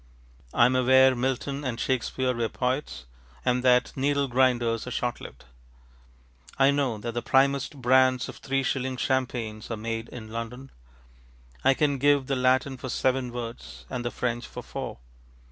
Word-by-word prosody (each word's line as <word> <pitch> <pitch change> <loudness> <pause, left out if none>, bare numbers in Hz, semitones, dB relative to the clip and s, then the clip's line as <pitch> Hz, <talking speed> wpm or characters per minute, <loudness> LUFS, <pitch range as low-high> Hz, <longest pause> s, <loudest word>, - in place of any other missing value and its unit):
I 120 - +5
am 125 +1 +3
aware 130 +1 +5
Milton 135 +3 -2
and 125 -3 -3
Shakespeare 130 0 0
were 115 -2 -1
poets, 125 - -3 0.4
and 125 0 +1
that 125 -1 +3
needle 140 +1 +1
grinders 120 -2 +1
are - - -3
short 125 0 -2
lived. - - -11 1.1
I 135 +1 +5
know 140 -5 0
that 115 +3 -4
the 120 +1 -3
primest 135 +2 +1
brands 130 0 +4
of - - -9
three 135 0 -1
shilling 130 -1 -2
champagnes 120 -5 -2
are 115 - -3
made 115 +1 -4
in 110 -3 -9
London. 120 +4 -6 0.9
I 135 - +5
can 140 -2 +1
give 145 0 +3
the 135 - -1
Latin 130 +1 +2
for 130 - -7
seven 130 0 0
words, 120 -1 -7
and 125 -2 -3
the 120 - -1
French 120 0 -3
for - - -8
four. - - -6
130 Hz, 160 wpm, -26 LUFS, 120-135 Hz, 1.1 s, I